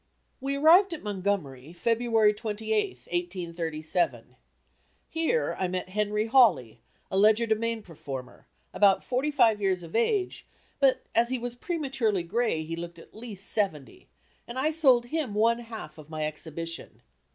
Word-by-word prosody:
We 275 +1 -1
arrived 340 +6 +6
at 325 - -7
Montgomery, 185 -9 -3
February 225 +1 +2
28th, 210 - -2
1837. 175 -2 -3 0.7
Here 330 +9 0
I 185 - +1
met 180 0 -4
Henry 210 +2 0
Hawley 180 - +4 0.3
a 190 - 0
legerdemain 220 +2 +2
performer, 135 -7 -9 0.3
about 200 -2 +4
forty 260 +4 -1
five 230 -7 +3
years 190 -3 0
of 165 +3 -9
age, 370 - 0 0.3
but 265 -2 +3
as 235 +1 +3
he 260 - 0
was 240 0 -4
prematurely 250 - -1
gray 200 -3 0
he 165 +1 -5
looked 170 0 -7
at 165 - -15
least 215 -4 -8
seventy, 200 - -3 0.4
and 235 - -7
I 295 +4 +1
sold 265 -7 +4
him 260 -5 -3
one 230 +2 +3
half 220 -10 -9
of 155 0 -13
my 155 -1 -3
exhibition. 165 +2 -6
210 Hz, 140 wpm, -27 LUFS, 170-245 Hz, 0.7 s, arrived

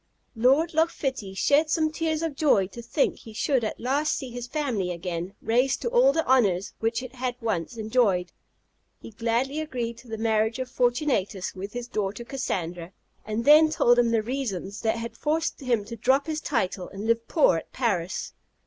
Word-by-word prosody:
Lord 270 +9 +3
Loch 320 +2 +3
Fitty 260 -12 -4
shed 295 +9 +3
some 310 0 +1
tears 315 0 -1
of 325 -3 -1
joy 270 -10 +3
to 235 - -9
think 240 +5 0
he 225 - -12
should 255 +2 +1
at 215 - -3
last 280 +5 +1
see 265 -3 -6
his 245 0 -6
family 245 -11 -1
again 175 +1 -4
raised 250 +4 +2
to - - 0
all - - +5
the 320 - 0
honours 205 -8 +2
which 230 +2 -1
it 255 0 -9
had 255 -1 -3
once 225 -2 -2
enjoyed. 215 -5 +1 0.7
He - - -11
gladly 235 +6 -1
agreed 240 -6 -4
to 250 - -16
the 225 -1 -5
marriage 220 0 +1
of 255 -1 -5
Fortunatus 245 - 0
with 195 +2 -7
his 240 0 -5
daughter 210 0 -3
Cassandra, 180 -9 -4 0.3
and 220 +2 -2
then 310 +2 +8
told 245 -5 +4
him 240 -1 +3
the 225 -1 +1
reasons 215 -6 -4
that 225 0 +1
had 230 0 -6
forced 315 +5 -1
him 240 -7 0
to 230 +2 -7
drop 260 +5 +2
his 310 -1 -3
title 195 -10 -2
and 200 +2 -7
live 230 0 +1
poor 290 - +4
at - - -8
Paris. 195 -9 -2
235 Hz, 190 wpm, -26 LUFS, 210-275 Hz, 0.7 s, then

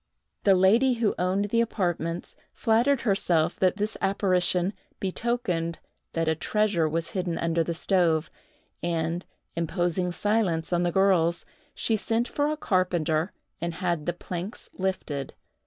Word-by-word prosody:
The 195 -2 +6
lady 225 +8 +4
who 230 -3 +1
owned 195 +3 0
the 230 - +4
apartments 175 -6 -2 0.2
flattered 235 +3 +3
herself 180 -6 +1
that 185 0 +3
this 210 +1 -1
apparition 185 -1 +2 0.3
betokened 185 -5 -1 0.4
that 165 -1 0
a 160 - +4
treasure 180 -1 +1
was 165 +1 -2
hidden 180 -3 -2
under 165 0 +1
the 170 0 -3
stove, 170 -3 +2 0.5
and, 170 +1 -1 0.3
imposing 175 +1 0
silence 180 -3 0
on 175 - +2
the 175 0 +1
girls, 175 -3 +3 0.3
she 225 - 0
sent 225 +3 0
for 290 0 0
a 305 0 -1
carpenter 175 - +1 0.3
and 170 0 -2
had 175 -4 -1
the 175 - +1
planks 180 +4 -6
lifted. 185 -8 -3
180 Hz, 140 wpm, -27 LUFS, 170-205 Hz, 0.5 s, The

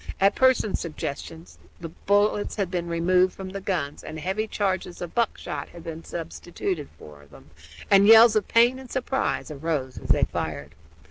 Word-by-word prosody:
At 195 +1 +4
Pearson's 260 -6 +2
suggestion 160 0 -6 0.3
the 165 - -7
bullets 205 +4 0
had 195 -4 -2
been 175 -2 -2
removed 180 +2 +2
from 190 -1 -8
the 195 +1 -6
guns 160 -7 -3
and 155 - -7
heavy 190 +6 -2
charges 190 -4 -2
of 175 -2 -6
buckshot 235 -2 -2
had 170 -1 -12
been 165 0 -7
substituted 170 -1 -5
for 75 -2 -14
them, 75 +1 -17 0.4
and 200 0 +6
yells 225 0 +8
of 215 - +1
pain 240 +3 +4
and 260 -2 -12
surprise 260 - -2
rose 145 -3 -3
as - - -10
they - - +3
fired. - - -4
185 Hz, 165 wpm, -25 LUFS, 165-210 Hz, 0.4 s, yells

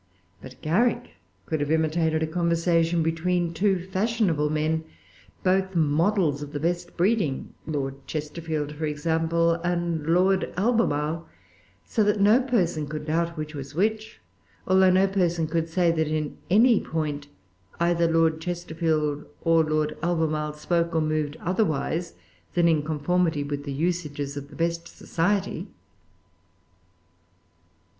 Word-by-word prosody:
But 130 -1 -12
Garrick 210 +11 +1 0.3
could 155 - -2
have 145 0 -1
imitated 160 0 +1
a - - +2
conversation 170 0 +1
between 170 +1 0
two 195 +3 +2
fashionable 190 -6 0
men, 155 +1 0 0.6
both 190 0 +1
models 160 0 +2
of 145 0 -7
the 145 - -2
best 175 +2 -2
breeding, 180 - 0
Lord 135 -3 -4
Chesterfield, 155 -1 -3
for 155 +1 -3
example, 165 +2 +1
and 170 -3 -1
Lord 185 +3 +2
Albemarle, 170 -8 0 0.6
so 220 - +1
that 205 0 +2
no 210 +6 +5
person 175 - 0
could 150 0 -5
doubt 170 +2 -1
which 155 0 -5
was 140 0 -7
which, 215 +4 -1 0.5
although 190 0 +5
no 185 +1 +4
person 175 -4 +1
could 165 +1 -1
say 170 0 +2
that, 160 -2 0
in 155 -1 -2
any 225 +4 +5
point, 150 -3 -3 0.5
either 170 -1 +2
Lord 165 -1 +2
Chesterfield 160 -4 -1 0.2
or 165 -1 +4
Lord 155 -1 0
Albemarle 155 -3 0
spoke 170 +2 -1
or 160 - +3
moved 155 -1 -1
otherwise 170 -2 -1 0.4
than 170 -1 +4
in 160 -3 +3
conformity 160 +1 0
with 145 0 -4
the 140 - -4
usages 145 -2 -2
of 140 0 -7
the 145 - -13
best 170 0 -1
society. 190 +4 -1
165 Hz, 135 wpm, -25 LUFS, 155-180 Hz, 0.6 s, no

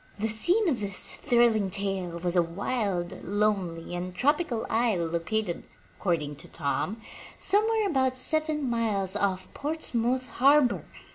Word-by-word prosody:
The 220 +2 -1
scene 355 - +4
of 270 -8 +1
this 200 -2 +1
thrilling 235 -6 +2
tale 195 -3 -3
was 175 +1 -2
a 175 - +5
wild, 180 +1 -3
lonely 195 -4 -1
and 180 +1 -5
tropical 280 - +1
isle 220 -7 +1
located, 170 +3 -2 0.4
accord 170 -5 0
ing 145 0 -6
to - - -6
Tom, 165 +8 -2 0.4
somewhere 430 +2 +3
about 260 -6 +1
seven 305 +2 0
miles 210 -5 0
off 195 -2 -1
Portsmouth 255 -5 -1
Harbor! 270 +2 +3
215 Hz, 135 wpm, -27 LUFS, 180-260 Hz, 0.4 s, a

